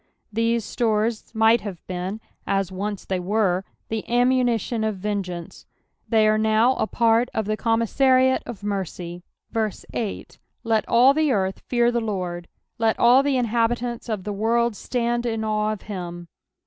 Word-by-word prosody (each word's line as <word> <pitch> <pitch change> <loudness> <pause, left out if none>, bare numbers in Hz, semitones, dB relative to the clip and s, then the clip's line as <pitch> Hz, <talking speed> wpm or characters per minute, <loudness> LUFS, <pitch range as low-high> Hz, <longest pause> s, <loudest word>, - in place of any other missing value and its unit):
These 230 0 +1
stores 220 -1 -1
might 220 +1 +4
have 200 -3 -6
beeu, 185 +3 -4 0.3
as 195 -1 0
once 200 +2 -4
they 190 -1 -1
wcr^ 190 -1 +1 0.3
the 220 -1 -2
ammunition 245 -2 +2
of 215 -1 0
vengeance, 185 -4 -5 0.4
they 220 -2 +4
are 215 0 +3
now 220 +3 +3
a - - 0
part 230 +2 +2
of 220 - 0
the 215 +1 0
commissariat 255 +4 +3
of 230 -4 -7
mercyS 190 +2 -4
8 220 -4 -5 0.2
Let 225 -2 0
all 250 +4 +6
the 310 -1 +2
earth 190 -4 0
fear 240 -1 +2
the 235 -1 0
LORD: 180 -5 -4 0.3
let 225 -1 +2
all 245 +3 +6
the 275 -1 +1
inhabitants 240 0 -1
of 210 -4 -2
the 210 - -4
world 230 +2 +1
stand 240 +1 -1
in 225 -1 -2
awe 215 0 0
of 215 - -6
him. 175 -4 -7
220 Hz, 155 wpm, -23 LUFS, 200-235 Hz, 0.4 s, all